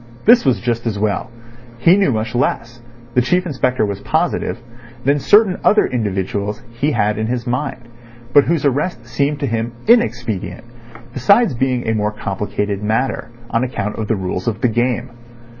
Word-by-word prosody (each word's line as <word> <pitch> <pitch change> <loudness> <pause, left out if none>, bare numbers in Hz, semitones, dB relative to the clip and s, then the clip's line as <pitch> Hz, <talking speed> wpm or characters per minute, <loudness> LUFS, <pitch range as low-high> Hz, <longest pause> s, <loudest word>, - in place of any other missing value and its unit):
This 235 -2 +6
was 130 -3 +2
just 120 0 -2
as 105 -3 -1
well. 105 -1 -1 0.5
He 165 +10 +5
knew 195 -7 +2
much 110 -1 -2
less—the 120 0 -2
Chief 180 +9 +1
Inspector 130 -6 0
was 100 -1 -4
positive—than 120 +3 -2
certain 205 +4 +4
other 215 - +4
individuals 100 -2 -2
he 140 +6 -1
had 105 -2 +1
in 110 - -1
his 120 0 -2
mind, 125 -1 -3 0.5
but 145 - +6
whose 165 -3 0
arrest 140 -2 -1
seemed 140 +5 -1
to - - +1
him 115 -1 -2
inexpedient, 115 - +1 0.5
besides 200 - +4
being 125 -1 -1
a 110 - +2
more 105 -1 0
complicated 105 -1 -3
matter, 110 +3 -1 0.2
on 115 - +1
account 105 -5 -3
of 110 - -2
the 110 - +1
rules 90 -1 -4
of 115 -1 -2
the 125 - +3
game. 120 +1 -1
120 Hz, 160 wpm, -18 LUFS, 110-135 Hz, 0.5 s, This